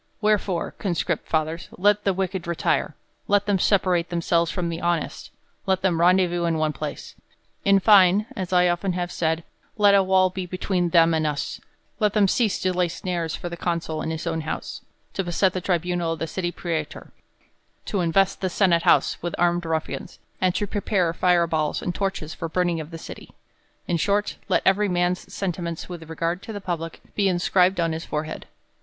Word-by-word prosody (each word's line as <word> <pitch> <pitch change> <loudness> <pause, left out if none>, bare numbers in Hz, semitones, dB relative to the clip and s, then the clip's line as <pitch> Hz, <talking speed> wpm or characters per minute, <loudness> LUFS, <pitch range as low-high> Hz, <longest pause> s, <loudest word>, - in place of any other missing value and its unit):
Wherefore, 210 -5 0
con 185 -4 -1
script - - -2
fathers, 160 +1 -1
let 205 +2 +3
the 195 - +4
wicked 190 -2 -2
retire; 170 -1 0 0.3
let 205 0 +3
them 200 -2 +1
sepa 200 +1 +3
rate 175 -2 +1
themselves 170 -1 +1
from 175 -2 -2
the 165 +1 -4
honest; 175 -1 -2 0.4
let 190 -1 +1
them 170 -3 +2
rendezvous 175 -1 +3
in 165 -1 +1
one 155 -1 0
place. - - -6 0.5
In 195 0 +5
fine, 200 0 +6
as 185 -2 -4
I 180 -1 +5
have 175 0 +1
often 180 -2 -1
said, 160 -1 -1 0.3
let 205 -1 +5
a 200 -1 +5
v/all 185 0 +3
be 185 -1 -5
between 180 -1 -1
them 165 0 +5
anii 155 -1 +1
us; 145 - -5 0.4
let 210 -2 +2
them 210 -2 +4
cease 220 +1 +1
to 185 0 +1
lay 180 0 +1
snares 170 -1 -3
for - - -6
the 170 - -5
consul 170 -2 -2
in - - -3
his 160 -1 -4
own 160 - -1
house; 155 - -5 0.3
to 195 - -1
beset 180 +2 +1
the 185 - -3
tribunal 175 -1 0
of - - -6
the 165 - -2
city 175 +2 -3
prastor; 165 -4 -4 0.7
to 195 - -1
invest 185 +3 +2
the 190 - 0
senate 175 -2 +3
house - - +3
with 175 - -3
armed 175 0 +2
rutnans, 160 -1 -3 0.2
and 185 -1 +2
to 205 - 0
prepare 195 -4 0
fire 175 0 +3
balls 155 -2 -1
and 175 - -3
torches 190 -6 -3
for 165 - -5
burning 175 0 0
the 165 - -7
city: - - -11 0.5
in 170 - +1
short, 200 +6 0
let - - +2
every 200 +2 +3
man's 180 0 -1
sentiments 170 -3 -4
with 165 -3 -9
regard 165 +3 -2
to - - -8
the 205 - -5
public 170 -4 -5
be 200 -1 +1
inscribed 180 +1 +2
on 165 -1 +1
his 160 +1 -4
forehead. 155 - -5
175 Hz, 195 wpm, -24 LUFS, 165-190 Hz, 0.7 s, fine